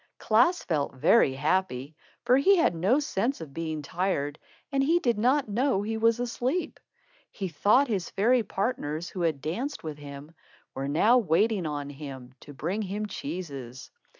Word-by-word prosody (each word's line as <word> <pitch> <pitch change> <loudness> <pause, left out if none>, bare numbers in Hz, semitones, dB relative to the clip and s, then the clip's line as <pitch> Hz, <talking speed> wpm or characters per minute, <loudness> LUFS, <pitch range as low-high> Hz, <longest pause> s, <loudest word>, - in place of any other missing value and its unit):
Klaas 245 +12 +3
felt 145 -5 -1
very 130 - +4
happy, 150 -1 -1 0.3
for 250 - +5
he 390 +9 +5
had 335 - +3
no 190 - +2
sense 270 -2 -1
of 150 -4 -9
being 160 -1 -4
tired, 145 -3 -2 0.3
and 275 -1 +1
he 325 +5 +3
did 240 -10 0
not 260 +4 +2
know 215 -1 +1
he 220 +2 -2
was 230 +1 +2
asleep. 245 +7 -2 0.5
He 195 - -5
thought 210 - +3
his 200 -7 -2
fairy 235 +5 +3
partners, 180 -7 -3
who 185 - -6
had 160 -5 0
danced 235 - -4
with 155 -2 -6
him, 145 +2 -10 0.4
were 135 +1 -4
now 210 - +4
waiting 200 -1 +1
on 145 -1 -4
him 135 -3 -9
to - - -12
bring 170 +9 -3
him 205 +1 -3
cheeses. 140 - -7
190 Hz, 165 wpm, -27 LUFS, 150-235 Hz, 0.5 s, for